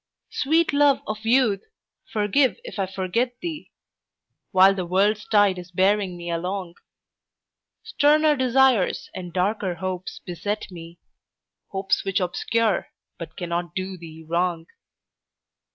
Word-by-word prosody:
Sweet 320 +3 +1
love 285 -1 +4
of 215 +1 -5
youth, 230 -5 +3 0.5
forgive 225 +5 +2
if - - -8
I 195 - 0
forget 195 +6 -1
thee 325 -3 -6 0.8
While 190 +1 +6
the 190 -2 -3
world's 205 +4 +1
tide 205 -3 +3
is 180 0 -10
bearing 190 0 +1
me 170 0 -5
along; 180 +1 -3 1.1
Sterner 300 +1 +3
desires 260 -5 +2
and 180 -1 -7
darker 185 +1 -1
hopes 185 0 -5
beset 205 +4 -4
me, 170 -1 -10 0.7
Hopes 190 -1 -1
which 195 0 0
obscure 210 +4 0 0.3
but 160 -2 -8
cannot 175 0 -3
do 190 0 -3
thee 160 -2 -11
wrong. 170 0 0
195 Hz, 120 wpm, -24 LUFS, 180-230 Hz, 1.1 s, While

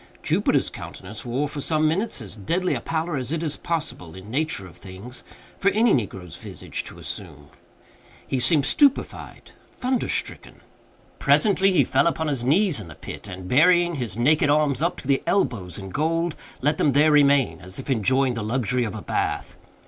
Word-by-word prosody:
Jupiter's - - +1
countenance - - -8
wore, 130 +5 -1
for 145 0 -6
some 155 +1 +2
minutes, 170 - 0
as 105 - -8
deadly 170 - -1
a - - -2
pallor 165 -1 -2
as 130 +1 -4
it 165 0 -1
is 150 -3 -1
possible, 155 - -3
in 95 +3 -10
nature 145 -7 -1
of 90 - -14
things, 100 +7 -9 0.4
for 200 - +4
any 220 +2 +3
negro's 95 - -3
visage - - -6
to - - -10
assume. 75 0 -7 0.8
He 130 - -1
seemed 145 +2 +3
stupefied—thunderstricken. 265 - -1 0.6
Presently 195 -2 +4
he 185 - +4
fell - - +2
upon 160 -2 0
his 135 -5 -2
knees 160 - +3
in 100 - -8
the 75 - -11
pit, - - -9
and, 95 -1 -8
burying 175 - +4
his 115 -6 -3
naked 145 +5 +3
arms 150 -1 +2
up 170 +2 0
to - - -11
the 140 -1 +2
elbows 100 - 0
in 95 -2 -8
gold, 165 - 0 0.3
let 150 +3 +1
them 145 - +3
there 150 +3 +5
remain, 140 -3 +4
as 95 0 -9
if 135 - -8
enjoying 130 +1 +2
the 115 - -4
luxury 125 +2 0
of 110 - -5
a 110 - -7
bath. - - -2
140 Hz, 180 wpm, -24 LUFS, 115-165 Hz, 0.8 s, there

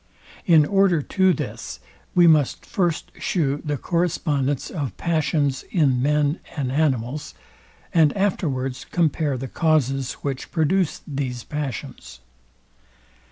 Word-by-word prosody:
In 160 -4 +6
order 195 -4 +3
to 190 +3 +3
this 165 - -5 0.4
we 175 -1 +6
must 155 -5 +3
first 175 -6 -1
shew 145 -5 0
the 150 -2 -2
correspondence 150 -5 -1
of 140 - -4
passions 155 -4 0
in 135 -8 +2
men 150 +2 +1 0.2
and 130 -3 -1
animals, 140 -1 -1 0.6
and 160 -3 +5
afterwards 135 -10 -1
compare 155 -4 +1
the 130 +2 -5
causes, 135 -3 +1
which 135 -2 -3
produce 170 +2 +1
these 135 -5 -4
passions. 145 -6 -6
150 Hz, 115 wpm, -23 LUFS, 135-170 Hz, 0.6 s, In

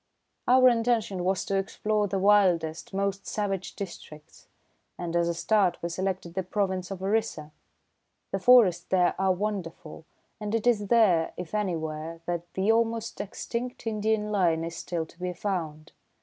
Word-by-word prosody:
"Our 255 +1 +7
intention 230 -6 +1
was 185 +1 0
to 195 - 0
explore 210 +2 0
the 195 - -2
wildest, 185 -5 +3
most 195 0 -2
savage 195 -3 -3
districts, 155 -5 -10 0.5
and 170 -1 -4
as 170 0 +2
a 170 - -1
start 190 -1 +2
we 170 - -1
selected 185 -1 -3
the 190 - -1
province 185 -1 -2
of 190 -1 -6
Orissa. 195 -7 -1 0.8
The - - -1
forests 240 -8 +6
there 180 -2 +3
are 190 0 +3
wonderful, 180 -5 -4 0.3
and 210 +1 -2
it 230 - -1
is 215 -4 +2
there, 190 -8 +3
if 180 0 -7
anywhere, 165 -5 -3
that 175 0 -4
the 195 +3 +2
almost 230 0 0
extinct 235 +5 -5
Indian 215 -1 0
lion 170 -5 +2
is 165 0 -5
still 165 -1 -3
to 170 - -21
be 180 0 -3
found. 165 -5 -4
190 Hz, 155 wpm, -27 LUFS, 170-210 Hz, 0.8 s, Our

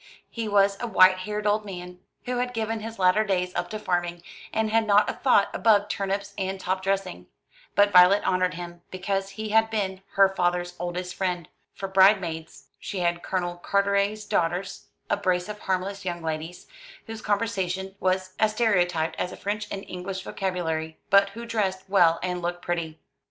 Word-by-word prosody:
He 230 -2 -4
was 200 -1 +3
a 240 - -3
white 185 -3 +6
haired 210 0 -3
old 210 +1 +2
man, 180 -2 -8 0.3
who 250 0 -2
had 245 0 -2
given 225 0 -2
his 225 +1 -7
latter 185 +3 +4
days 180 -3 -1
up - - -2
to 215 - -4
farming, 175 -4 -2 0.3
and 220 -1 0
had 225 0 +2
not 205 0 +5
a - - -1
thought 245 -7 +3
above 205 -2 +3
turnips 200 +1 -2
and 190 0 -2
top 185 0 -2
dressing; 195 -1 -2 0.5
but 205 0 +5
Violet 180 +2 +6
honoured 185 0 +1
him, 175 0 -8
because 195 +1 -2
he 215 +2 -6
had 225 +1 +3
been 195 -4 -2
her 195 0 +6
father's 175 -2 -1
oldest 180 +1 -4
friend. 180 -4 -2 0.3
For 195 - -4
bride 190 +2 +6
maids 160 -2 -7
she 195 -3 -4
had 175 0 0
Colonel 175 -2 -2
Carteret's 200 +3 0
daughters, 175 +3 -1 0.2
a - - +1
brace 185 -2 0
of 210 0 -7
harmless 190 +1 -2
young 175 -2 -4
ladies, 160 +2 -5 0.4
whose 225 -1 -7
conversation 195 -3 -1
was 185 0 0
as 215 -1 +3
stereotyped 175 -8 +1
as 180 - -2
a - - -9
French 210 +1 -3
and 195 - -5
English 185 +1 -5
vocabulary, 160 -5 -3
but 200 0 +6
who 230 +4 -8
dressed 195 -5 -1
well 175 -4 +4
and 180 -1 -2
looked 175 0 -3
pretty. 170 -2 -3
190 Hz, 180 wpm, -26 LUFS, 180-205 Hz, 0.5 s, white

